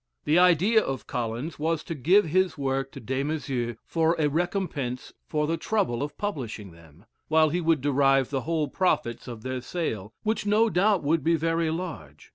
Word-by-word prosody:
The 155 Hz, +4 st, +4 dB
idea 180 Hz, +5 st, +5 dB
of 135 Hz, -1 st, -4 dB
Collins 120 Hz, +7 st, -4 dB
was 160 Hz, +1 st, 0 dB
to -, -, -5 dB
give 175 Hz, +8 st, +4 dB
his 185 Hz, +2 st, +1 dB
work 135 Hz, -1 st, -1 dB
to -, -, -8 dB
Des 130 Hz, +4 st, -2 dB
Maizeaux 135 Hz, -6 st, -2 dB
for 165 Hz, 0 st, +1 dB
a 150 Hz, -2 st, +2 dB
recompense 155 Hz, -6 st, -2 dB
for 150 Hz, -1 st, 0 dB
the 165 Hz, +2 st, -1 dB
trouble 180 Hz, -, -1 dB
of 145 Hz, +1 st, -4 dB
publishing 120 Hz, -, -4 dB
them, 85 Hz, +3 st, -18 dB, 0.2 s
while 155 Hz, 0 st, +4 dB
he 175 Hz, +4 st, -1 dB
would 160 Hz, -4 st, +2 dB
derive 135 Hz, -1 st, +3 dB
the 135 Hz, -2 st, -1 dB
whole 160 Hz, +1 st, -1 dB
profits 135 Hz, -8 st, -1 dB
of 115 Hz, -3 st, -8 dB
their 130 Hz, -1 st, -3 dB
sale, 115 Hz, -, -4 dB
which 220 Hz, +1 st, 0 dB
no 215 Hz, +2 st, +3 dB
doubt 195 Hz, 0 st, +2 dB
would 155 Hz, +3 st, +1 dB
be 165 Hz, +1 st, +3 dB
very 165 Hz, +1 st, 0 dB
large. 155 Hz, -, -6 dB
150 Hz, 185 wpm, -26 LUFS, 130-170 Hz, 0.2 s, idea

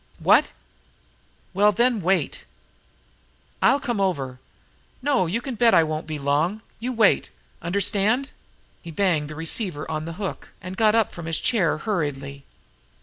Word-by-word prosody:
"What?....Well, -, -, -1 dB
then, 235 Hz, +1 st, +1 dB
wait! 190 Hz, +3 st, 0 dB, 1.2 s
I'll 280 Hz, -, +4 dB
come 235 Hz, -6 st, -2 dB
over....No, 180 Hz, -, -3 dB
you 215 Hz, +8 st, -1 dB
can 265 Hz, -, -5 dB
bet 235 Hz, 0 st, +4 dB
I 165 Hz, -, +6 dB
won't 155 Hz, 0 st, -3 dB
be 155 Hz, -1 st, -4 dB
long! 150 Hz, +9 st, 0 dB, 0.2 s
You 245 Hz, +3 st, -3 dB
wait! 225 Hz, -4 st, +3 dB, 0.3 s
Understand?" 200 Hz, -, +1 dB, 0.5 s
He 170 Hz, -, -10 dB
banged 160 Hz, -3 st, 0 dB
the 155 Hz, -, -7 dB
receiver 165 Hz, +1 st, -2 dB
on 155 Hz, 0 st, -3 dB
the 165 Hz, -, -5 dB
hook, 200 Hz, -3 st, -6 dB
and 185 Hz, -1 st, -7 dB
got 215 Hz, +1 st, +3 dB
up 225 Hz, -3 st, +2 dB
from 170 Hz, -2 st, -7 dB
his 165 Hz, -, 0 dB
chair 205 Hz, -11 st, +1 dB
hurriedly. 145 Hz, -7 st, -3 dB
185 Hz, 140 wpm, -24 LUFS, 155-220 Hz, 1.2 s, I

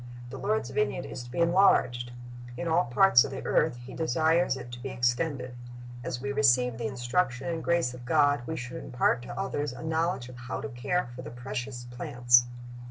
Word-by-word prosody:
The -, -, -7 dB
Lord's 215 Hz, +1 st, -1 dB
vineyard 425 Hz, 0 st, -1 dB
is -, -, -6 dB
to 120 Hz, -, -10 dB
be 125 Hz, -, -8 dB
enlarged. 170 Hz, -9 st, +3 dB, 0.5 s
In 170 Hz, -, -3 dB
all 165 Hz, +2 st, +3 dB
parts 120 Hz, +1 st, +6 dB
of 140 Hz, -, -4 dB
the 135 Hz, -, -7 dB
earth -, -, +2 dB
He 130 Hz, -, -9 dB
desires 160 Hz, 0 st, +2 dB
it 120 Hz, -1 st, -9 dB
to 120 Hz, -, -8 dB
be 135 Hz, -, -4 dB
extended. 125 Hz, +2 st, -1 dB, 0.5 s
As 125 Hz, -, -3 dB
we 135 Hz, +2 st, -3 dB
receive 125 Hz, -4 st, +3 dB
the 115 Hz, -, -1 dB
instruction 125 Hz, +3 st, -1 dB
and 165 Hz, -2 st, -3 dB
grace 170 Hz, -8 st, +1 dB
of 125 Hz, 0 st, -10 dB
God, 145 Hz, 0 st, +3 dB
we 160 Hz, -, -3 dB
should 125 Hz, -2 st, -6 dB
impart 125 Hz, -1 st, +1 dB
to 120 Hz, -, -7 dB
others 145 Hz, -8 st, -2 dB
a 125 Hz, -, -9 dB
knowledge 160 Hz, -4 st, -1 dB
of 125 Hz, -1 st, -11 dB
how 125 Hz, 0 st, -5 dB
to 110 Hz, -, -5 dB
care 120 Hz, +10 st, -1 dB
for 125 Hz, -, -7 dB
the -, -, -8 dB
precious 120 Hz, +1 st, -5 dB
plants. 120 Hz, -1 st, +3 dB
125 Hz, 200 wpm, -28 LUFS, 120-160 Hz, 0.5 s, parts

